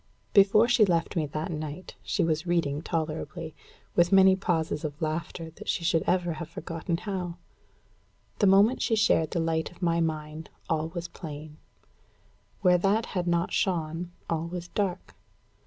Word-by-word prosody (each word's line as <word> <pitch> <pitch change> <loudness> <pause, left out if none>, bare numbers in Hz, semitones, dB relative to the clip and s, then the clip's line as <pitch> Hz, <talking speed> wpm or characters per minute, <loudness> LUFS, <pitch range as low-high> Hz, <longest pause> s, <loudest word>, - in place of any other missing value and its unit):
Before 205 +3 +6
she 240 -2 +5
left 170 -4 +1
me 155 -3 0
that 155 +5 -4
night 155 +2 -6
she - - 0
was 160 +1 0
reading 155 -4 0
tolerably, 160 0 -3 0.4
with 175 0 +4
many 190 -1 +7
pauses 165 -4 -1
of 150 -1 -5
laughter 160 +1 -3
that - - -9
she - - 0
should 165 -1 +2
ever 175 -2 +1
have 165 0 -7
forgotten 165 0 -4
how. 180 -2 -4 1.0
The 205 - +4
moment 200 +6 +5
she 225 - +2
shared 165 -7 +3
the 170 - -2
light 165 -1 0
of 180 +1 -12
my 170 -1 +2
mind, 155 -1 -3 0.2
all 160 0 0
was 170 0 -5
plain; 155 -2 -9 1.0
where 180 -2 +5
that 205 +5 +2
had 180 -3 -3
not 170 0 +1
shone, 170 -1 -1 0.2
all 165 0 -1
was 175 0 -6
dark. 195 -3 -2
170 Hz, 160 wpm, -28 LUFS, 160-180 Hz, 1.0 s, many